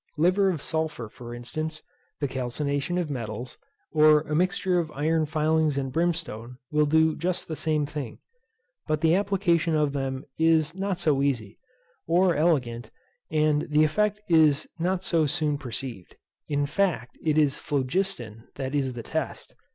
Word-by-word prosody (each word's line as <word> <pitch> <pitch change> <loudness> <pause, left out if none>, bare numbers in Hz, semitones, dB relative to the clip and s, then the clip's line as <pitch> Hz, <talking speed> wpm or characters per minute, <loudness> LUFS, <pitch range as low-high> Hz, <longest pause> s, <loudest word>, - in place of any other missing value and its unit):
Liver 185 +5 +3
of 165 -6 -2
sulphur 160 -7 -2
for 120 +1 -9
instance, 155 +6 -5 0.4
the 145 - +1
calcination 140 +5 -2
of 170 -4 -1
metals, 120 -1 -5 0.3
or 155 -1 +6
a 155 -1 -5
mixture 180 +2 +1
of 165 -2 -2
iron 155 +2 +1
filings 155 -1 +1
and 135 -1 -2
brimstone 155 -8 -2
will 150 0 +3
do 160 +1 +3
just 180 +2 -2
the 160 - -4
same 155 -1 0
thing; 145 -5 -6 0.7
but 155 -1 0
the 160 0 +4
application 180 -4 +2
of 150 -2 +1
them 135 -1 -3
is 160 -1 +3
not 190 0 -2
so 150 -6 +1
easy, 120 -7 -1 0.5
or 180 +2 +4
elegant, 125 -8 +1 0.4
and 150 -1 +2
the 150 +1 +4
effect 210 +6 +1
is 155 -3 +4
not 180 +2 0
so 165 -4 +2
soon 150 -1 0
perceived. 125 - -7 0.3
In 145 -1 0
fact, 145 - -1
it 155 -1 +1
is 145 -3 +3
phlogiston 130 - -2
that 135 0 -4
is 135 -3 0
the 120 -1 -6
test. - - -4
155 Hz, 155 wpm, -26 LUFS, 135-165 Hz, 0.7 s, or